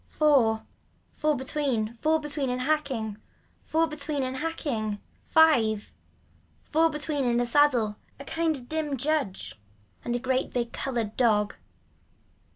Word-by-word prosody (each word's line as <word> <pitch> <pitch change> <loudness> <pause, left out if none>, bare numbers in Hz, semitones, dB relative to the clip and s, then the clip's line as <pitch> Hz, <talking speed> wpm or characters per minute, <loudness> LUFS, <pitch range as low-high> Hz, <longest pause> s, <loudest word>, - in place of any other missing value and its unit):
Four. 255 -8 +3 0.5
Four 305 0 +1
between, 260 -5 -1
four 315 +7 +1
between 295 -3 -2
and 250 0 -1
hacking. 260 -7 -1 0.5
Four 325 +1 +2
between 300 -2 -3
and 260 0 -3
hacking. 260 -9 -2 0.3
Five. 230 -10 +4 0.7
Four 325 +2 +3
between 300 -2 -2
and 240 -1 +2
a 245 - +2
saddle, 240 -5 +3 0.2
a 280 - -8
kind 325 -1 0
of 245 -2 -13
dim 305 -2 -2
judge 225 - -2 0.4
and 240 - -1
a - - 0
great 260 +1 0
big 240 -1 -1
so - - -6
colored 235 -5 -2
dog. 210 -4 +3
265 Hz, 140 wpm, -27 LUFS, 230-305 Hz, 0.7 s, Five